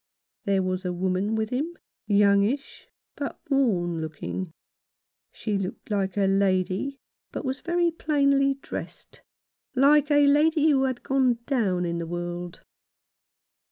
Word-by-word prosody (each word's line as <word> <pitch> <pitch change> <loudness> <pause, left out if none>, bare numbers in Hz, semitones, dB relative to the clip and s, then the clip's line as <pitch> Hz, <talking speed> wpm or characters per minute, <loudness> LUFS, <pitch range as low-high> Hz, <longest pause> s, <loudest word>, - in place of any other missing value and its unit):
There 195 -1 +2
was 185 0 -2
a 180 - -2
woman 185 +4 -1
with 220 0 -2
him, 305 +7 -2 0.3
youngish, 205 +5 +2 0.3
but 285 -1 -5
worn 180 -12 +1
looking. 160 +3 -5 0.8
She 210 -3 -2
looked 195 +3 -6
like 195 -2 -1
a 200 - +3
lady, 195 +6 +1 0.3
but - - -5
was 260 0 -2
very 345 0 +1
plainly 280 -3 +2
dressed 275 - -8 0.3
— - - -48
like 295 0 +5
a 290 -1 +5
lady 305 +2 +4
who 270 -2 +3
had 260 -2 -3
gone 260 -3 +2
down 195 -10 0
in 170 0 -2
the 170 - -4
world. 175 0 -5
215 Hz, 135 wpm, -26 LUFS, 185-280 Hz, 0.8 s, like